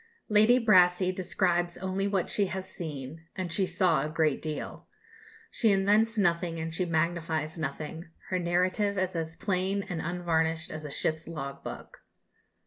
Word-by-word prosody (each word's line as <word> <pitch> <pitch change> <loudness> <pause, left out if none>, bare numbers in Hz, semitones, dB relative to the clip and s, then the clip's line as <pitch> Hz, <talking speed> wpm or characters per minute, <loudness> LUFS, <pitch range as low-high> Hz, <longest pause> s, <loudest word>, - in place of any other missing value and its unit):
Lady 215 +3 +6
Brassey 185 -5 +5
describes 175 -2 0
only 190 +1 -1
what 195 -3 0
she 200 -2 +1
has 190 0 -5
seen 160 -3 -7
and 180 -3 -3
she 190 +3 +1
saw 175 -4 +2
a 150 - -2
great 155 -2 +1
deal. 155 -1 -5 0.6
She 225 -3 +3
invents 210 +4 +3
nothing 170 -3 +1
and 160 0 -4
she 180 +3 0
magnifies 160 -1 -1
nothing; 155 +2 -4 0.3
her 185 - +1
narrative 185 +4 +1
is 185 -1 -1
as 165 0 -3
plain 195 +1 -1
and 175 -4 -4
unvarnished 165 -1 0
as 155 -1 -6
a - - -5
ship's 155 +2 -1
log 140 -4 -6
book. - - -8
175 Hz, 155 wpm, -29 LUFS, 160-190 Hz, 0.6 s, Lady